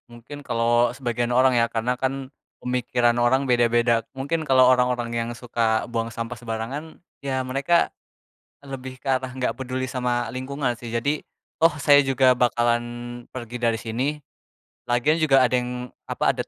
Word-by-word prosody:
Mungkin 120 +5 -11
kalau 120 -1 +2
sebagian 120 -2 -2
orang 130 +1 +5
ya, 115 0 +3
karena 115 +2 -1
kan 135 0 -3 0.3
pemikiran 125 -1 +1
orang 130 +3 +3
beda-beda, 120 -2 +2
mungkin 145 +5 -1
kalau 130 -2 +5
orang-orang 125 -2 +2
yang 115 0 -2
suka 115 -2 0
buang 115 -1 -2
sampah 115 +1 -5
sembarangan, 120 +9 -6 0.2
ya 135 -2 -1
mereka 140 +6 +1 0.7
lebih 130 -2 -8
ke - - -7
arah 130 -1 0
enggak 130 -1 -1
peduli 130 0 -3
sama 125 -2 -1
lingkungan 130 +1 -2
sih. 120 -2 -8
Jadi 140 +6 0 0.4
toh 165 -1 +5
saya 145 0 +6
juga 135 -1 +4
bakalan 120 -1 +2 0.5
pergi 120 -1 -6
dari 115 -2 +1
sini. 115 +4 -2 0.8
Lagian 130 +7 +2
juga 135 -4 +5
ada 125 - +2
yang, 125 0 -5 0.2
apa - - +1
ada - - -5
125 Hz, 155 wpm, -24 LUFS, 120-135 Hz, 0.8 s, saya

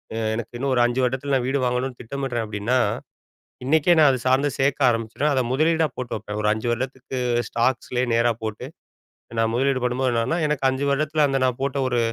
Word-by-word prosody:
அ - - -3 0.2
எனக்கு 120 +1 -6
இன்னும் 135 +1 -1
ஒரு 120 - +3
5 120 +2 0
வருடத்தில 130 +3 -1
நான் 125 -2 0
வீடு 135 +2 0
வாங்கணும்னு 125 +1 -2
திட்டமிடுறேன் 125 -1 -3
அப்படின்னா, 105 +4 0 0.9
இன்னைக்கே 160 +5 +4
நான் 150 -2 +7
அத 130 - 0
சார்ந்து 135 +3 +3
சேர்க்க 135 -1 +3
ஆரம்பிச்சுருவேன். 115 +6 -1
அத 130 - +2
முதலீடா 160 +3 +2
போட்டு 125 -1 -4
வைப்பேன். 105 0 -6
ஒரு 105 - +2
5 110 +2 -4
வருடத்துக்கு, 130 +2 -4 0.3
ஸ்டாக்ஸ்லயே 125 +1 0
நேரா 120 +1 +3
போட்டு, 110 +2 -4 0.7
நான் 115 0 +2
முதலீடு 135 +2 +1
பண்ணும்போ 125 +1 0
என்னன்னா, 115 +8 0
எனக்கு 150 -3 -1
5 130 +1 -2
வருடத்தில் 150 +2 +1
அந்த 135 -1 0
நான் 125 -1 -1
போட்ட 140 0 -1
ஒரு 120 -2 0
130 Hz, 190 wpm, -23 LUFS, 120-140 Hz, 0.9 s, நான்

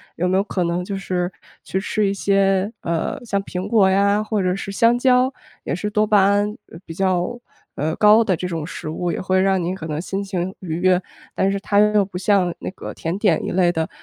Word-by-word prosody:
有 180 +2 0
没 185 +1 +2
有 195 - +2
可 185 -3 -2
能 175 +1 -1
就 200 +1 -4
是 180 -1 -2 0.3
去 190 - -2
吃 210 +1 0
一 195 - 0
些， 195 0 +1
呃， 170 - -2
像 200 -3 -1
苹 180 -1 -5
果 205 -5 +4
呀 200 +2 +2
或 215 -1 -1
者 185 0 0
是 195 0 -5
香 230 +3 +3
蕉， 255 +1 +3 0.3
也 - - -3
是 210 +4 -3
多 210 +1 +2
巴 205 -2 +5
胺， 205 +2 +1 0.2
呃 165 - -10
比 165 - -8
较， 185 +5 -1 0.4
呃， 155 +3 -1
高 215 +2 +6
的 190 -4 +1
这 180 +3 -4
种 165 -4 -4
食 155 - -7
物 175 +2 -2
也 - - -3
会 185 0 +1
让 190 -1 +2
您 175 +2 -1
可 165 -3 -7
能 150 0 -3
心 195 +2 -3
情 190 -1 -3
愉 165 -4 -4
悦。 185 0 +3 0.3
但 195 +1 +1
是 200 - -2
它 205 0 +1
又 210 -1 +4
不 190 - -15
像 190 -2 +2
那 - - -5
个 - - -8
甜 165 +4 -3
点 200 -7 +2
一 - - -3
类 180 -1 +3
的， 160 -1 -2
190 Hz, 250 characters per minute, -21 LUFS, 180-205 Hz, 0.4 s, 高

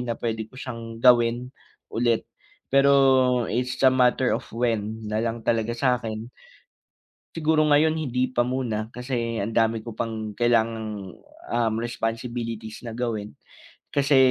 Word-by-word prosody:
na 120 -2 -3
pwede 110 -1 -3
ko - - -14
siyang 115 -3 -7
gawin 120 0 +4 0.4
ulit, 115 0 +1 0.5
pero 135 -3 +5
it's 125 +1 -1
a 130 - +7
matter 125 0 +3
of - - -3
when 110 -2 -1
nalang 115 +2 -2
talaga 115 0 0
sa'kin. 115 -4 0 1.1
Siguro 155 -1 +2
ngayon 150 +1 +4
hindi 130 -5 -1
pa 120 - +3
muna 120 -3 -2
kasi 120 -2 -3
ang 105 +3 -3
dami 115 0 +2
ko 115 - -7
pang 110 -2 -4
kailangang, 110 -5 0 0.4
um, 115 -2 +1
responsibilities 115 -1 -4
na 115 - -6
gawin 110 -4 -3 0.6
kasi, 140 -1 +3
120 Hz, 130 wpm, -25 LUFS, 115-125 Hz, 1.1 s, a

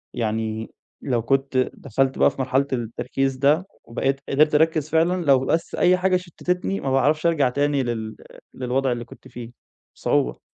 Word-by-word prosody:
يعني 110 -1 -2 0.3
لو 125 -4 0
كنت 135 +3 0 0.2
دخلت 135 +1 -1
بقى - - +5
في - - -5
مرحلة 135 +2 +1
التركيز 125 +3 -2
ده 150 +7 +3 0.2
وبقيت 135 +3 -1
قدرت 150 +2 +3
أركز 155 -1 +2
فعلًا، 170 +3 +2
لو 135 -3 +5
بس 160 +5 -1
أي 180 +1 +4
حاجة 185 0 +2
شتِتتني 180 +2 -3
ما 135 - -2
باعرفش 150 +4 +2
أرجع 150 -6 +3
تاني 145 0 0
لل 110 -3 -4 0.4
للوضع 130 +1 -1
اللي 120 -1 -3
كنت 130 - -15
فيه 120 -1 -9 0.4
بصعوبة. - - 0
135 Hz, 160 wpm, -23 LUFS, 120-155 Hz, 0.4 s, بقى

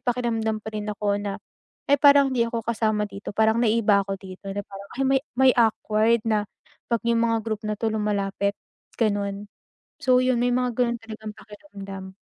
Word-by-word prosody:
pakiramdam 235 -3 -1
pa 220 - -6
rin 210 0 -4
ako 205 0 -1
na, 200 -1 -3 0.5
"Eh, 285 0 +5
parang 280 -2 +6
hindi 240 -2 +2
ako 230 -1 -4
kasama 215 -2 0
dito, 200 +1 -8
parang 220 +1 +3
naiiba 215 -3 +3
ako 195 -1 -3
dito." 190 +1 -11
Na 205 +1 -3
parang, 200 0 -11
ah, 270 - -1
may 270 0 +3 0.2
may 265 0 +6
awkward 220 0 +2
na 210 -2 +1 0.4
'pag 235 -2 0
'yung 235 -1 +3
mga 230 0 +2
group 220 -2 -3
na 210 0 -2
'to 220 +1 -1
lumalapit, 200 -1 -1 0.4
gano'n. 205 -2 -1 0.5
So 255 -1 +4
'yon, 255 -1 +2
may 245 - +2
mga 250 -1 0
gano'n 235 -2 +1
talagang 220 -1 -8
pakiramdam. 195 -3 -10
220 Hz, 180 wpm, -24 LUFS, 205-235 Hz, 0.5 s, parang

